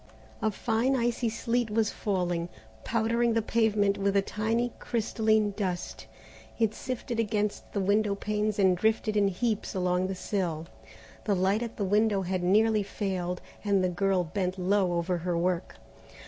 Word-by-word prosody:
A 220 - +2
fine 230 +5 0
icy 240 -1 0
sleet 230 +1 -1
was 215 0 +1
falling, 175 -4 -1 0.3
powdering 230 +1 +1
the 225 - +3
pavement 210 -3 +2
with 200 0 +1
a - - +5
tiny 225 +4 -1
crystalline 220 -2 +1
dust. 185 -4 -4 0.5
It 225 -2 +2
sifted 245 -2 -4
against 210 -2 -1
the 200 - -1
window 200 +1 +2
panes 210 +1 -1
and 190 -2 +4
drifted 220 +2 +1
in 205 -1 +4
heaps 215 +2 -1
along 180 0 +1
the 190 - -3
sill. 180 -5 -2 0.6
The 205 - +2
light 190 +4 +2
at 235 -1 -5
the 205 - -1
window 205 0 +2
had 185 0 -1
nearly 215 +4 +3
failed, 185 -3 -3 0.2
and 200 -2 +2
the 185 - +2
girl 190 0 +1
bent 180 +2 -2
low 185 0 +2
over 175 +1 0
her 175 0 -1
work. 175 +1 -1
205 Hz, 160 wpm, -28 LUFS, 185-220 Hz, 0.6 s, a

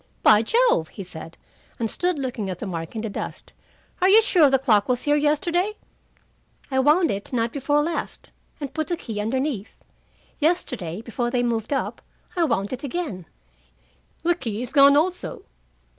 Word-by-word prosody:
"By 215 0 +7
Jove!" 455 - +2
he 195 - -8
said, 165 -2 -9 0.4
and 230 - -1
stood 355 +8 0
looking 250 -7 -3
at 185 - -4
the 215 - -6
mark 165 0 -5
in 220 - -2
the 225 - -3
dust. - - -6 0.5
"Are 370 - +5
you 440 +3 +7
sure 335 -9 +5
the 270 - +4
clock 230 -6 +2
was 250 -1 +1
here 290 0 +3
yesterday?" 340 +7 +1 1.0
"I 265 - +2
wound 305 +5 +4
it 200 +7 -4
night 230 -2 0
before 290 +1 +1
last, 330 +1 -4 0.3
and 285 -3 -5
put 315 -1 -2
the 345 - -1
key 220 -9 -5
underneath. 250 -1 -3 0.6
Yesterday, 250 - -1
before 240 +1 -2
they 245 0 0
moved 230 -1 -1
up, 275 - -2 0.3
I 345 -2 +3
wound 215 -6 -1
it 255 - -6
again." 275 - -4 1.0
"The 345 +1 +4
key 235 -8 -4
is 245 - -6
gone 280 0 +7
also. 360 +4 -1
265 Hz, 175 wpm, -24 LUFS, 220-310 Hz, 1.0 s, By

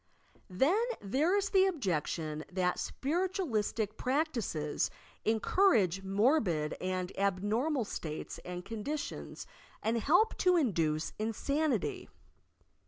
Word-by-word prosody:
Then 285 - +3 0.2
there 290 - +1
is 400 -1 -1
the 385 -1 +5
objection 160 - -2
that 180 -1 0
spiritualistic 270 - -1
prac 300 +5 +1
tices 155 - -1 0.4
encourage 220 - +3
morbid 195 - +2
and 185 0 -2
abnormal 215 - +1
slates 155 -6 -5
and 180 0 -7
condi 225 +7 -3
tions - - -6 0.4
and 225 +2 +1
help 355 - +4
to 365 -1 +4
induce 165 - +1
insanity. 245 - -1
220 Hz, 105 wpm, -32 LUFS, -, 0.4 s, the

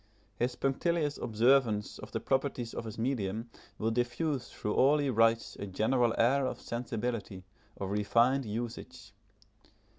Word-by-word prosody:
His 125 +1 0
punctilious 150 +3 0
observance 115 -2 +2
of - - -9
the - - -2
proprieties 130 -3 -1
of - - -5
his 110 - -7
medium 115 -2 -2 0.3
will 110 +1 0
diffuse 125 +3 -1
through 105 - -3
all 140 +3 +5
he 145 -2 0
writes 115 0 +2
a 100 - -5
general 115 +5 +1
air 130 +3 +3
of - - -4
sensibility, 115 -4 -4 0.3
of 95 0 -4
refined 115 +6 +3
usage. 115 0 -6
120 Hz, 140 wpm, -31 LUFS, 110-130 Hz, 0.3 s, all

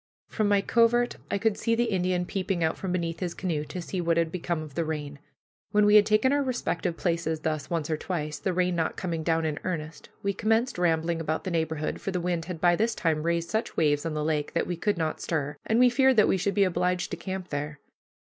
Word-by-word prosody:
From 215 -2 0
my 205 -1 +4
covert 240 +2 +3
I - - 0
could 210 +1 0
see 230 - +1
the 240 - +2
Indian 180 -1 0
peeping 185 -2 -2
out 160 - +1
from 190 - -4
beneath 170 -2 -2
his 175 -2 -3
canoe 165 -6 -2
to 170 +4 -6
see 185 +1 -3
what 170 -1 +1
had 165 -1 +1
become 170 -2 -2
of 150 -3 -10
the 165 - 0
rain. 150 -2 -4 0.5
When 210 0 +4
we 210 - +5
had 210 -1 +7
taken 215 +6 +3
our 285 - +2
respective 245 -10 -2
places 165 -2 -1
thus 155 -2 -2
once 165 -3 -1
or 155 - -1
twice, 155 -3 -3
the 190 - -1
rain 180 0 +1
not 165 -1 -1
coming 170 -3 -2
down 165 0 +1
in 150 -2 -2
earnest, 160 -3 -5
we 200 0 +1
commenced 225 +2 +1
rambling 165 -1 +1
about 160 0 -2
the 185 - -3
neighborhood, 160 -2 -2
for - - -3
the 185 -2 -1
wind 175 -2 -1
had 180 -3 -6
by 175 +1 +4
this 225 +4 0
time 160 -3 0
raised 170 +1 -1
such 220 +1 -2
waves 145 -2 +2
on 165 -2 -3
the 150 - -1
lake 150 -1 -1
that 170 - +1
we 180 - -3
could 205 +3 0
not 160 -2 -2
stir, 145 -3 -2
and 220 - +2
we 250 - +7
feared 265 +1 +4
that 210 - +6
we - - +3
should 195 +2 -1
be 200 - +5
obliged 180 0 0
to - - -3
camp 190 -1 -5
there. 150 +1 -4
175 Hz, 245 wpm, -27 LUFS, 160-200 Hz, 0.5 s, had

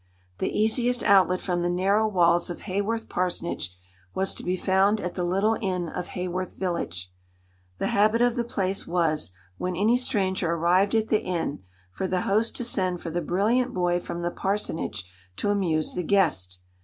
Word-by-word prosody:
The - - 0
easiest 240 +3 +2
outlet 185 -2 +4
from 175 -2 -1
the 175 - 0
narrow 195 +5 +2
walls 175 -4 +3
of 175 - -6
Haworth 210 +4 -2
parsonage 170 - -2 0.4
was 190 0 +2
to - - -4
be 180 +1 -1
found 195 +3 +2
at 180 -2 -4
the 180 - -2
little 195 +5 +1
inn 180 -4 -1
of 175 - -5
Haworth 180 0 -3
village. 90 - -3 0.6
The - - -1
habit 215 +3 +4
of 240 0 +3
the 240 - 0
place 195 -4 -2
was, 165 - +1 0.3
when 180 0 -2
any 215 +7 +3
stranger 190 -8 0
arrived 180 +5 +2
at 220 0 +1
the 215 - +2
inn, 165 - -3 0.3
for 145 - -3
the 185 -1 0
host 215 +5 +1
to - - 0
send 185 -6 0
for 165 - -6
the 175 +2 -1
brilliant 215 +10 +1
boy 175 -1 +1
from 170 0 -6
the 175 - -1
parsonage 180 - -2 0.3
to 205 - 0
amuse 170 -6 0
the 180 - -2
guest. 150 - +1
185 Hz, 180 wpm, -26 LUFS, 175-205 Hz, 0.6 s, outlet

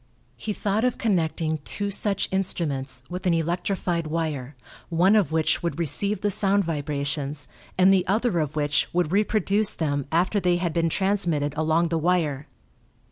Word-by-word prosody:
He 215 - -4
thought 210 +1 -1
of 250 -1 +1
connecting 160 -6 0
two 200 +5 -3
such 200 0 0
instruments 145 -9 -2
with 185 +1 -4
an 170 - +3
electrified 170 0 -1
wire, 150 -4 -3 0.3
one 180 +5 +4
of 200 -8 +2
which 160 0 +1
would 170 -1 -2
receive 180 +5 0
the 205 - +1
sound 200 +1 +2
vibrations 145 -2 -3 0.3
and 185 +1 +6
the 185 -2 +2
other 210 -1 +1
of 150 -1 -2
which 145 -2 +1
would 175 -2 +1
reproduce 210 0 +2
them 145 -4 -2
after 180 +5 +2
they 180 -2 +2
had 175 -2 -1
been 165 -1 +1
transmitted 170 -7 0
along 160 +2 +1
the 165 -1 0
wire. 155 -4 0
170 Hz, 160 wpm, -25 LUFS, 155-195 Hz, 0.3 s, and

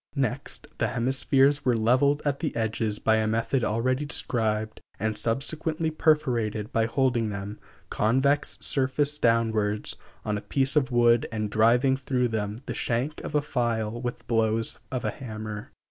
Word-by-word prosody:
Next 135 +2 -2
the - - +2
hemispheres 135 +3 +2
were 125 -3 +2
leveled 130 +6 +3
at 140 -1 0
the 160 - -3
edges 110 -2 -1
by 110 +1 +2
a 110 0 +1
method 115 +4 0
already 130 +5 0
described, 110 -6 -2 0.2
and 110 +1 -1
subsequently 155 +8 -1
perforated 120 -10 +1
by 115 -1 +2
holding 120 -3 +1
them, 100 +1 -6 0.3
convex 135 +6 +1
surface 145 +2 0
downwards, 110 -3 +1 0.3
on 105 -1 -1
a - - -12
piece 135 +4 0
of 140 -3 +3
wood, 120 -1 +4
and 110 -2 -3
driving 120 +5 +4
through 130 -2 0
them 105 -1 -2
the - - -4
shank 125 +6 -2
of 150 - -5
a 145 - +2
file 120 -4 -1
with 120 -1 -5
blows 115 -1 0
of 130 -1 -3
a - - 0
hammer. 110 -4 -7
120 Hz, 155 wpm, -26 LUFS, 110-135 Hz, 0.3 s, wood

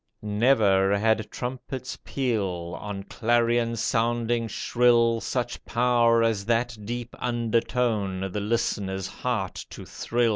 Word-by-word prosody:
Never 105 -3 +3
had 110 0 +1
trumpet's 130 +1 -5
peal. 95 -10 -2
On 100 -1 -5
clarion 115 +1 +1
sounding 115 +1 0
shrill, 115 +1 +3
Such 120 -1 -3
power 120 -1 +3
as 110 -3 +1
that 120 +1 +1
deep 120 +2 -5
undertone 115 -4 0
The 105 - -2
listener's 100 -4 -1
heart 110 -3 -3
to - - -9
thrill. 120 0 0
115 Hz, 110 wpm, -26 LUFS, 105-120 Hz, -, Never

